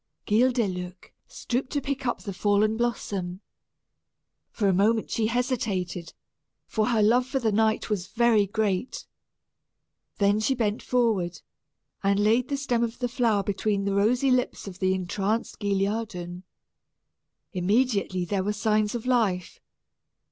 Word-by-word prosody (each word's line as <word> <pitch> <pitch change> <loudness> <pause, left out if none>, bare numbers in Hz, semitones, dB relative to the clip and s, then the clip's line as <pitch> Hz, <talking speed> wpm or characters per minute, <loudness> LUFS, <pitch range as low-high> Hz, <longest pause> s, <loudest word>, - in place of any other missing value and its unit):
Guildeluec 205 -6 0
stooped 255 +2 -3
to 290 - +1
pick 275 -1 -3
up 240 - -2
the 200 - -5
fallen 205 +3 +2
blossom. 200 -6 -2 1.1
For 205 - -1
a 190 - +4
moment 215 +4 +2
she 220 -1 +1
hesitated, 215 -8 -2 0.5
for 215 -1 0
her 225 -3 +2
love 245 +4 +3
for 270 - -1
the 230 -4 +1
knight 220 +1 +1
was 185 -3 -1
very 230 -3 +3
great. 210 +1 -2 1.1
Then 205 +1 +3
she 265 +5 +1
bent 215 -3 -1
forward, 220 -8 0 0.6
and 200 0 +2
laid 225 +4 +3
the 280 - -1
stem 245 -4 0
of 230 0 -3
the 250 - -1
flower 230 -4 +1
between 200 0 -1
the 200 - 0
rosy 240 +7 +2
lips 250 -1 0
of 190 -1 -8
the 190 0 +2
entranced 195 +4 -2
Guilliadun. 195 -3 -2 1.1
Immediately 200 -1 +1
there 190 +1 -1
were 205 +2 -1
signs 215 0 +1
of 235 - -4
life. 215 -8 0
215 Hz, 140 wpm, -26 LUFS, 195-235 Hz, 1.1 s, a